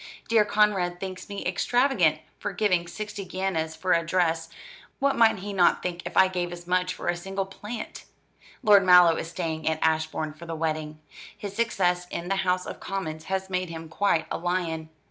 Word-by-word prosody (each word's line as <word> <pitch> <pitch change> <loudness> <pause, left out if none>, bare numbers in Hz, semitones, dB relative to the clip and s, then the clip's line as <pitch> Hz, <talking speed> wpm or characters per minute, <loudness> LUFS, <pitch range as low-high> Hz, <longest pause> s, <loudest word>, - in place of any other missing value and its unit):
Dear 220 -2 +4
Conrad 205 -4 +2
thinks 190 0 -6
me 200 0 -5
extravagant 185 - +2 0.2
for 205 - -4
giving 180 -3 +1
sixty 210 +2 -6
guineas 185 -4 -2
for 180 +3 +1
a 170 - +2
dress 165 -2 0 0.5
what 280 -1 +1
might 225 -2 +5
he 200 +2 -6
not 180 -3 +3
think 175 -1 -3
if - - -6
I 190 - +7
gave 180 -2 -3
as 175 0 -8
much 180 0 0
for - - -7
a 175 - +2
single 195 +2 -3
plant? 210 +4 -8 0.6
Lord 205 -3 +7
Mallow 180 -2 +7
is 165 - -4
staying 165 -2 -2
at 160 - 0
Ashbourne 160 -1 0
for 165 +2 -12
the 165 - -4
wedding. 155 -1 -2 0.4
His 200 -1 -7
success 180 -6 +1
in 175 +1 -5
the 195 - +1
House 185 -1 0
of - - -7
Commons 160 -5 -5
has 190 0 -2
made 185 -1 -2
him 165 -1 -7
quite 185 -1 +1
a - - -2
lion. 170 -3 -2
180 Hz, 190 wpm, -26 LUFS, 165-195 Hz, 0.6 s, I